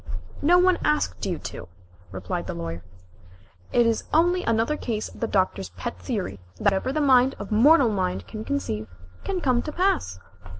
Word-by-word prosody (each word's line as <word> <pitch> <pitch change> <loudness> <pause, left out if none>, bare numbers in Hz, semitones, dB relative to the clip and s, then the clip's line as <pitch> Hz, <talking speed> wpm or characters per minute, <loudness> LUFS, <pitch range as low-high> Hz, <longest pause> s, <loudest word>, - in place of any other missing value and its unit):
"No 345 +5 +5
one 365 0 +4
asked 300 -8 0
you 175 -3 -1
to," 85 - -8 0.4
replied 95 -1 -4
the - - -4
Lawyer. 85 0 -5 0.9
"It 240 - +4
is 230 -1 0
only 350 +3 +3
another 230 +5 +1
case 225 -7 -3
of - - -14
the 230 - -1
Doctor's 185 - 0
pet 90 -1 -5
theory 95 +2 -4 0.2
that - - -9
whatever 200 +6 +2
the 305 +2 0
mind 265 -2 +4
of 205 - -8
mortal 260 +4 +6
mind 185 -3 -2
can 215 -1 -7
conceive, 165 - -3 0.4
can 375 -2 -2
come 250 -5 +2
to 305 - -5
pass." 360 - 0
230 Hz, 175 wpm, -25 LUFS, 180-300 Hz, 0.9 s, mortal